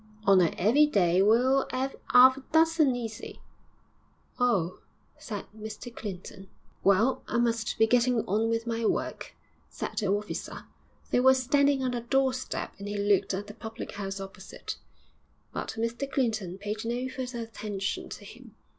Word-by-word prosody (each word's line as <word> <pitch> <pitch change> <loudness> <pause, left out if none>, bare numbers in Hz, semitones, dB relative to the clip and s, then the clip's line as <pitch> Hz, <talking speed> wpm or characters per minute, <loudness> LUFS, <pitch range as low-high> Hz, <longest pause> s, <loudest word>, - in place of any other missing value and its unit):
on 195 -3 +6
a 170 - +4
'eavy 255 +11 +5
day 185 - +3
we'll 250 +6 +4
'ave 260 +1 -1 0.2
'alf 255 +1 +8
a 270 - -9
dozen, 320 -4 +4
easy.' 225 -3 -6 1.0
'Oh!' 195 -8 +1 0.4
said 205 -4 -6
Mr 220 +2 -8
Clinton. 195 -1 -8 0.3
'Well, 210 +7 +3
I - - -1
must 230 -2 0
be 225 - +5
getting 240 0 +2
on 220 +4 +1
with 230 0 -1
my 230 0 -2
work,' - - -2 0.3
said - - -6
the 205 - -1
officer 205 +2 -3 0.5
they - - +3
were 260 +1 +6
standing 275 +1 +2
on 255 - 0
the 240 -1 -2
doorstep 260 +1 -1
and 200 - -6
he 205 0 -3
looked 200 -1 +2
at 200 +2 -4
the 210 - -10
public 225 0 -7
house 195 -1 -5
opposite, 195 0 -8 0.8
but - - -4
Mr 235 +4 -2
Clinton 215 -8 -1
paid 210 +2 -4
no 240 +2 -2
further 255 -2 -5
attention 210 -3 -4
to - - -9
him. - - -13
230 Hz, 155 wpm, -28 LUFS, 205-255 Hz, 1.0 s, alf